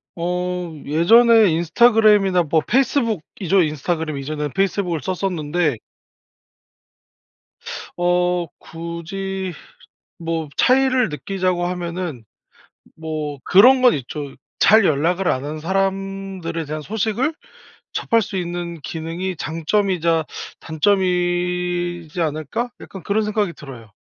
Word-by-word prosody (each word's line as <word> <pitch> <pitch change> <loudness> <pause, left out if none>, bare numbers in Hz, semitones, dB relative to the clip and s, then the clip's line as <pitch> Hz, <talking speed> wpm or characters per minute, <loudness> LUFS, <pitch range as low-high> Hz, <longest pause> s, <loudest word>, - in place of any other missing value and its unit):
어 180 0 -2
예전에 220 +7 +5
인스타그램이나 200 +1 +4
뭐 160 +1 +1
페이스북이죠? 220 - +1
인스타그램 155 0 -2
이전에는 150 +1 -4
페이스북을 190 -5 0
썼었는데 175 - -1 2.2
어 175 0 +1
굳이 180 +3 -5 0.7
뭐 165 -2 -3
차이를 255 -2 +3
느끼자고 180 +3 -2
하면은 175 -7 -4 0.7
뭐 155 -3 -5
그런 255 +7 +7
건 250 -2 +6
있죠. 140 +1 -5 0.2
'잘 215 -1 +6
연락을 175 +5 +1
안 130 - 0
한 155 +1 -5
사람들에 195 -2 -2
대한 155 +1 -5
소식을 220 - -1 0.6
접할 230 0 +1
수 195 - -5
있는 175 -2 -4
기능이 165 +5 -4
장점이자 165 0 0 0.4
단점이지 175 -1 0
않을까?' 155 - -2
약간 190 -4 -10
그런 205 +5 0
생각이 210 -4 0
들어요. 125 -8 -11
175 Hz, 250 characters per minute, -21 LUFS, 160-195 Hz, 2.2 s, 그런